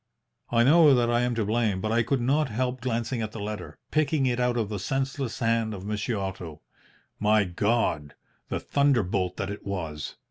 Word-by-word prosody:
"I 115 0 +3
know 150 +1 +6
that 120 -1 +2
I 120 0 +2
am 125 -1 0
to 115 -2 0
blame, 110 -2 +1
but 110 +2 -2
I 115 +1 +3
could 125 +3 0
not 140 +4 +2
help 125 +2 -2
glancing 120 0 -2
at 110 -1 -4
the 115 - -6
letter, 105 -2 -6
picking 155 -2 +2
it 125 -1 0
out 125 -1 +1
of 110 -3 0
the 105 -1 -4
senseless 135 +3 -2
hand 115 -2 0
of 95 0 -8
Monsieur 105 +2 -2
Otto. 95 -5 -5 0.6
My 105 0 +4
God! 95 -5 0 0.3
the - - -2
thunderbolt 105 -10 +1
that 100 0 -3
it 105 - -7
was! 80 -7 -5
115 Hz, 190 wpm, -26 LUFS, 100-125 Hz, 0.6 s, know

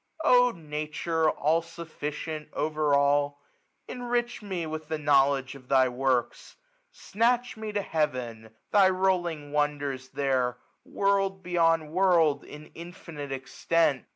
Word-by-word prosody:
Oh 250 -4 +6
Nature! 155 -2 -2
all 160 +3 +1
sufficient! 160 -2 -6
over 150 -1 +1
all! 145 0 +2 0.5
1350 - - -7
Enrich 240 -1 -2
me 190 -5 -4
with 155 0 -6
the 160 0 -2
knowledge 140 -2 +2
of 130 -2 -14
thy 130 -1 +4
works! 125 -1 -1 0.4
Snatch 240 +3 0
me 220 -1 -6
to 205 -1 -2
heaven; 125 -9 -2 0.2
thy 195 -2 +6
rolling 175 -6 0
wonders 145 -3 -1
ttiercji 130 -3 0 0.3
World 195 -1 0
beyond 165 -3 +1
world, 170 -5 +3
in 150 +1 -12
infinite 165 -4 -9
extent. 135 +1 0
155 Hz, 125 wpm, -27 LUFS, 140-180 Hz, 0.5 s, Oh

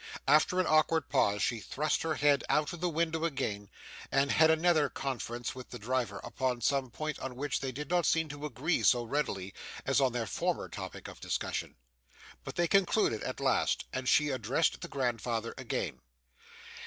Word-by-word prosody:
After 155 +5 +4
an 185 - +3
awkward 155 -1 +3
pause, 100 -1 +2
she 115 - 0
thrust 150 +8 -1
her 160 -1 -1
head 145 -1 +3
out 150 +3 +2
of 175 - -7
the 180 - +1
window 160 0 0
again, 105 - -2 0.4
and 135 0 +2
had 160 0 +5
another 160 -2 +3
conference 120 -3 -4
with 130 -1 -10
the 120 - -7
driver 120 -3 -2
upon 120 +1 -2
some 135 +1 +1
point 155 +5 -4
on 130 -1 -5
which 145 +2 -2
they 135 -1 -3
did 145 +3 -6
not 175 -1 +3
seem 160 -1 +2
to 145 +1 -5
agree 150 +6 0
quite - - +2
so 120 -1 +4
readily 110 -7 -2 0.3
as - - +3
on 130 -2 +3
their 120 -1 -2
former - - -1
topic - - -7
of - - -11
discussion; - - -3 0.7
but - - -7
they 175 0 +2
concluded 195 - +2
at - - -4
last, - - +1
and 130 0 -1
she 150 -1 +4
addressed 130 +4 0
the - - -5
grandfather 120 -3 -2
again. - - -3
140 Hz, 185 wpm, -31 LUFS, 120-155 Hz, 0.7 s, had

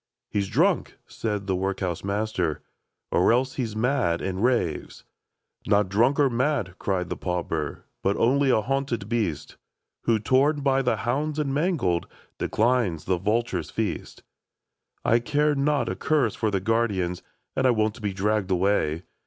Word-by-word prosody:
" - - -64
He 105 - +1
's 100 - -3
drunk 165 - +1
!" - - -47
said 105 -3 -3
the 95 -1 0
workhouse 95 -2 -2
master, 100 -5 -1
•* - - -17 0.5
Or 90 - +4
else 130 +2 +2
he 130 - -2
's 110 -2 -7
mad, 110 -8 +1
affd 95 0 -3
raves." 120 -10 0 0.3
" - - -24
Not 100 -2 +3
drunk 120 +9 +3
or 145 - +5
mad," 125 -6 0
cried 90 -3 -1
the - - -2
pauper, 90 -2 -3
" - - -52
But 100 - +1
only 135 +3 +3
a 110 -4 +3
hunted 135 -5 -1
beast. 105 -10 -2 0.5
Who, 115 -1 +3
torn 135 +7 +2
by 135 -1 +2
the 125 -3 +1
hounds 145 +5 -1
and 145 -3 -1
mangled. 140 - 0 0.3
Declines 110 -8 +1
the 90 -2 +1
vulture's 105 -4 -1
feast 105 -7 -4 0.4
*' - - -47
I 115 - +4
care 150 +5 +1
not 140 -2 +1
a^curse 115 +5 +1
for 110 - 0
the 100 -2 0
guardians, 95 -4 0 0.3
And 130 - +3
I - - +5
won't 110 0 +1
be 105 -1 -1
dragged 100 +1 0
away. 90 -4 +1
110 Hz, 175 wpm, -25 LUFS, 95-130 Hz, 0.5 s, or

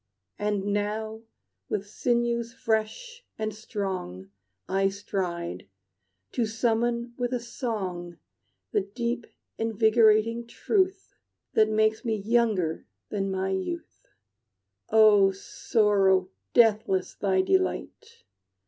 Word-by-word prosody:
And 205 -1 -1
now 215 +2 -2 0.5
with 205 - -2
sinews 235 +1 0
fresh 265 - -2
and 215 -1 -2
strong 190 - -5 0.4
I 195 +1 +2
stride, 185 -4 -4 0.6
to 235 -3 0
summon 235 +2 0
with 245 0 -1
a 250 - 0
song 195 - -4 0.5
The - - +2
deep, 235 +4 -3 0.3
invigorating 225 +1 +3
truth 380 - 0 0.4
That 215 0 +4
makes 215 +1 +2
me 225 -3 0
younger 210 -6 0 0.2
than 195 -2 -2
my 190 0 -1
youth. 335 - -4 0.8
"O 215 -3 +6
Sorrow, 195 -1 +2 0.2
deathless 210 -5 +3
thy 190 -2 +1
delight! 440 - -1
215 Hz, 95 wpm, -27 LUFS, 195-235 Hz, 0.8 s, O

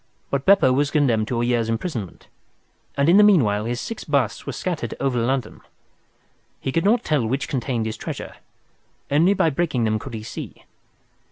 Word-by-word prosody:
But 140 -1 -1
Beppo 190 -10 +5
was 140 +2 +1
condemned 120 -8 +1
to 120 -1 -1
a - - +1
year's 120 -2 0
imprisonment, 115 - -4 0.7
and 140 +1 +2
in 175 +4 +6
the 210 - +7
meanwhile 115 - +4
his 120 +1 -2
six 230 - -6
busts 140 -7 -1
were - - -2
scattered - - -4
over 130 -3 0
London. 125 -1 -2 1.0
He 135 - -3
could 165 +5 0
not 230 +3 +3
tell 150 -5 +1
which 135 +4 -2
contained 125 -3 -2
his 110 0 -4
treasure. - - -7 0.7
Only 170 +8 +4
by 165 - +2
breaking 140 -5 -1
them 110 -1 +1
could 130 0 -8
he 110 - -6
see. - - -8
130 Hz, 180 wpm, -22 LUFS, 115-155 Hz, 1.0 s, the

